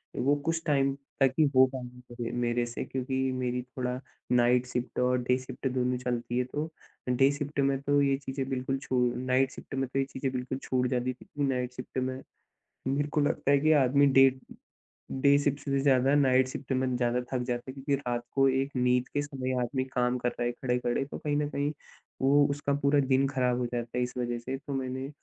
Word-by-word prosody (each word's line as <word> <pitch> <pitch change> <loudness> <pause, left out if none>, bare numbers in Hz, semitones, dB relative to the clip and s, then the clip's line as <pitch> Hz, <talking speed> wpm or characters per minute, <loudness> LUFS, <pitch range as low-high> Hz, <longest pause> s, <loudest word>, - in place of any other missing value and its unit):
वो 140 +3 +2
कुछ 165 0 0
टाइम 140 -3 +2 0.3
तक 135 -1 +5
ही 155 - +6
हो 130 - +8
पाया 125 -1 -7
म - - -5
मेरे 120 0 +1
से, 120 0 -5
क्योंकि 130 0 -3 0.2
मेरी 125 -1 -1
थोड़ा 125 0 -4 0.3
नाईट 125 0 +4
शिफ्ट 125 0 -3
और 125 0 +3
डे 125 +1 +2
शिफ्ट 130 +1 -5
दोनों 125 0 0
चलती 120 -1 -2
हैं। 125 - +1
तो 150 +2 -2 0.4
डे 135 +3 +4
शिफ्ट 145 0 -4
में 135 -1 +2
तो 145 0 +2
ये 140 -1 +2
चीजें 135 -1 -4
बिल्कुल 130 +1 -1
छू 130 -1 0 0.3
नाईट 130 +1 +2
शिफ्ट - - -9
में 135 -1 -1
तो 135 - -2
ये 135 - +1
चीजें 130 0 -2
बिल्कुल 125 0 -3
छूट 125 -1 +1
जाती 125 0 -1
थीं, 125 - -17
क्योंकि 145 -2 -2
नाईट 125 0 -2
शिफ्ट 125 +1 -8
में 130 0 -2 0.7
मेरे 145 +2 0
को 150 - 0
लगता 145 -1 +1
है 140 - +6
कि 155 +1 +4
आदमी 140 +3 +4
डे 135 0 +7 0.9
डे 140 0 +6
शिफ्ट 145 0 0
से 140 -1 0
ज़्यादा 135 0 +4
नाईट 130 -2 +4
शिफ्ट 130 +1 -5
में 130 -1 0
ज़्यादा 120 0 +1
थक 125 -1 0
जाता 120 0 -1
है, - - -7
क्योंकि 140 +1 -1
रात 120 -3 -3
को 135 0 +4
एक 135 +1 0
नींद 125 0 +2
के 145 - -1
समय 135 -3 -4
आदमी 130 +2 -1
काम 125 0 +1
कर 120 - 0
रहा 120 - -3
है 120 - 0
खड़े-खड़े, 125 +1 -1
तो 140 - -8
कहीं 145 -1 -1
न 145 0 0
कहीं 145 0 -1 0.5
वो 140 +2 +5
उसका 140 0 -1
पूरा 140 0 +4
दिन 135 0 +2
खराब 125 -3 +1
हो 125 - 0
जाता 120 +1 -3
है, - - +2
इस 125 - -6
वजह 120 -1 -1
से। 130 +3 -4
तो 140 +1 -8
मैंने 130 0 -3
130 Hz, 220 wpm, -29 LUFS, 125-140 Hz, 0.9 s, हो